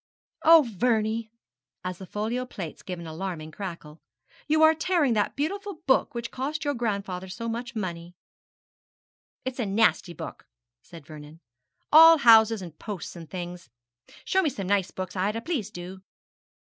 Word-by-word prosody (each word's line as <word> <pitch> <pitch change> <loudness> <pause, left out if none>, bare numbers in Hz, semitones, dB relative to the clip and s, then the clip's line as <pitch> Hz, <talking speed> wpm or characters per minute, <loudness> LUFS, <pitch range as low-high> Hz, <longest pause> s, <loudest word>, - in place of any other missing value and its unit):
'Oh, 320 -4 +7
Vernie!' 220 +1 0 0.5
as 185 -1 -5
the 190 - -9
folio 220 +6 -2
plates 190 -10 -8
gave 180 -1 -6
an 170 - -8
alarming 160 -1 -5
crackle, 170 -4 -8 0.5
'you 310 +1 +3
are 315 0 +7
tearing 320 -5 +1
that 210 -2 0
beautiful 395 +7 -3
big 320 - -29
book 265 -2 +2
which 235 0 -4
cost 295 +4 -3
your 290 - +1
grandfather 200 -6 -3
so 230 +5 -5
much 235 +1 -4
money.' 175 -4 -5 1.3
'It's 260 0 -4
a 240 - 0
nasty 200 -3 +2
book,' - - -9 0.3
said 165 -4 -13
Vernon, 155 0 -12 0.5
'all 325 +1 +10
houses 225 -5 +6
and 165 -3 -11
posts 200 -6 -6
and 165 -3 -10
things. 175 -1 -7 0.6
Show 380 - +2
me 325 - +1
some 205 -8 -6
nice 195 -1 +1
books, 185 0 -6
Ida; 205 +4 0
please, 245 - -3
do.' 185 -1 -9
215 Hz, 155 wpm, -26 LUFS, 180-255 Hz, 1.3 s, all